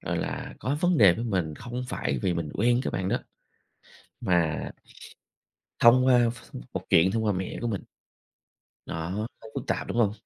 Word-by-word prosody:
gọi - - -2
là, - - -4
có 135 +3 -1
vấn 175 -1 +3
đề 95 -5 +7
với 115 - -4
mình 90 -9 -1
không 120 +6 -6
phải 70 - -2
vì 90 - +1
mình 85 -3 -3
quen 120 +3 +3
cái - - -1
bạn 95 0 -2
đó - - +1 1.1
mà 85 -7 +1 1.2
thông 125 +2 +6
qua 125 -2 +5
ph 120 - -13 0.2
một - - -3
chuyện 85 +3 +5
thông 110 0 0
qua 105 - +2
mẹ 95 0 -4
của 120 - -2
mình. 105 -5 -2 1.0
Đó, 80 0 -4 0.3
nó 110 - -11
phức - - -5
tạp, - - -1
đúng - - -3
hông? 110 -4 +4
110 Hz, 185 wpm, -27 LUFS, 90-120 Hz, 1.2 s, đề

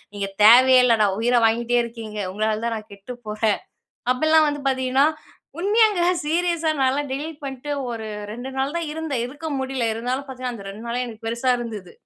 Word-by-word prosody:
நீங்க 200 -1 -2 0.2
தேவையே 255 +3 +8
இல்லடா! 225 -4 +4
உயிர 245 +2 +2
வாங்கிகிட்டே 235 +2 +2
இருக்கீங்க! 225 -2 -7
உங்களால 215 +1 0
தான் 230 -1 -1
நான் 215 - -11
கெட்டு 200 +5 -9
போறேன். 215 0 0 0.5
அப்பிட்லாம் 315 +3 +4
வந்து 290 -1 -4
பார்த்தீங்கன்னா 260 +2 +2 0.5
உண்மையாங்க, 415 -1 +3 0.2
சீரியஸா 335 0 +1
நான்லாம் 270 +2 +1
டெலீட் 300 +3 -5
பண்ணிட்டு 270 +1 -5 0.2
ஒரு 220 -1 -5 0.2
2 245 +4 -6
நாள் 275 +4 -1
தான் 335 -2 -3
இருந்தேன். 300 -6 -3
இருக்க 290 +5 -10
முடியல. 265 -2 -2
இருந்தாலும் 250 +4 -3
பார்த்தீங்கன்னா 255 -2 -5
அந்த 200 -2 -10
2 215 +4 -9
நாளே 245 +2 -1
எனக்கு 225 -1 -10
பெருசா 235 +3 +1
இருந்தது. 215 -7 -7
250 Hz, 170 wpm, -23 LUFS, 225-290 Hz, 0.5 s, தேவையே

